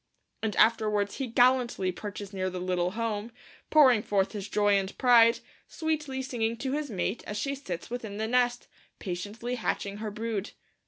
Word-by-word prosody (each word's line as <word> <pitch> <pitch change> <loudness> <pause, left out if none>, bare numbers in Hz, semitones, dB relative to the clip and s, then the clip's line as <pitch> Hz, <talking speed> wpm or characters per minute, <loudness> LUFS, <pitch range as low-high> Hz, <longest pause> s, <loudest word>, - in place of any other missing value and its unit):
And 220 -2 -1
afterwards 210 -3 +2
he 270 - -2
'gallantly 245 -5 +3
perches 205 +1 -7
near 185 -1 -1
the 185 0 -5
little 180 0 -1
home, 225 -1 -3 0.4
pouring 260 -8 +6
forth 200 -2 0
his 205 -2 -6
joy 205 -1 +3
and 195 0 -1
pride, 235 -2 +6 0.3
sweetly 300 -5 -2
singing 230 -3 -2
to 260 +2 -3
his 295 0 -2
mate 210 +2 -2
as 210 - -4
she 275 +6 -1
sits 210 -10 -6
within 220 -4 -5
the 220 - -1
nest, 245 0 +1 0.3
patiently 205 +6 -5
hatching 200 -3 -2
her 215 0 -4
brood.' 215 -1 -4
220 Hz, 165 wpm, -28 LUFS, 200-245 Hz, 0.4 s, pouring